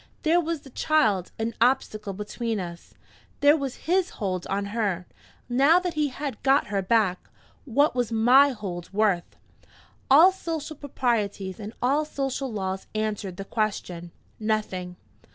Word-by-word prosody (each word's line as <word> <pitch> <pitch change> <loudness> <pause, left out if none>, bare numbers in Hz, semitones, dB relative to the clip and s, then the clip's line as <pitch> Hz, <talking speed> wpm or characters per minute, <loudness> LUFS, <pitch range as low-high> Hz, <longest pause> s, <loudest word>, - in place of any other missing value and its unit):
There 335 +2 +4
was 330 -2 -3
the 270 - -14
child, 215 - +1
an 225 +1 -2
obstacle 215 -5 +1
between 210 +2 -3
us 170 -2 -8 0.5
there 290 +1 +7
was 275 -4 -5
his 365 +2 +2
hold 185 -3 -2
on 200 +1 -1
her, 200 -6 -1 0.4
now 275 +7 +5
that 360 -1 -1
he 305 -2 +1
had 270 -3 -5
got 275 +1 +3
her 195 - +1
back! 190 -2 +1 0.4
What 285 +4 +2
was 245 -2 -1
my 250 +5 +6
hold 185 -8 -6
worth? 200 -4 +1 0.7
All 320 +8 +8
social 325 -4 -5
proprieties 220 -9 -2
and 210 0 -6
all 280 +5 +3
social 270 -3 -3
laws 190 -2 -3
answered 210 -4 -2
the 195 - -6
question: 190 -6 -3 0.3
Nothing! 210 -5 -2
225 Hz, 145 wpm, -26 LUFS, 195-285 Hz, 0.7 s, All